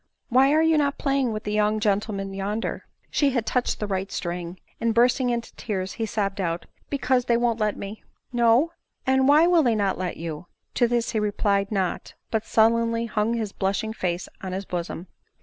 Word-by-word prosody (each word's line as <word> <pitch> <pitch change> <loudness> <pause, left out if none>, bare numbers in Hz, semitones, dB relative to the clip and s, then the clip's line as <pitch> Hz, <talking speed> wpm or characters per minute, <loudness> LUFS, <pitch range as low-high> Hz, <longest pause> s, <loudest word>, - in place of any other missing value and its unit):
" - - -52
Why 265 +3 +5
are 310 +2 +4
you 320 -1 +4
not 280 -1 +1
playing 275 -3 +1
with 215 0 -4
the 210 - -3
young 210 0 +2
gentlemen 200 -2 -1
yonder 200 +3 -3
?" - - -40
She 285 - +3
had 240 -4 0
touched 250 +1 0
the 210 - -1
right 195 -1 -3
string; 175 0 -4 0.2
and 230 -1 0
bursting 245 +2 +3
into 235 -1 -3
tears, 190 -4 -3
he 225 -1 -3
sobbed 200 -2 -1
out, 170 -1 -2
" - - -37
Because 260 -3 +1
they 235 -1 +3
won't 235 -1 +1
let 210 -1 0
me." 200 +2 -7
" - - -42
No? 235 +8 +4 0.3
and 265 0 +3
why 300 +3 +6
will 345 -1 +5
they 240 -6 +2
not 200 -3 0
let 180 -2 -3
you 165 0 -6
?" - - -52
To 240 - +4
this 235 -1 0
he 220 - 0
replied 205 -1 0
not; 190 -4 -2 0.2
but 220 -1 -1
sullenly 230 +1 +3
hung 225 0 0
his 220 -3 -2
blushing 200 +3 -1
face 180 -4 -2
on 185 -1 -5
his 195 +1 -4
bosom. 175 -1 -4
220 Hz, 215 wpm, -25 LUFS, 195-240 Hz, 0.3 s, why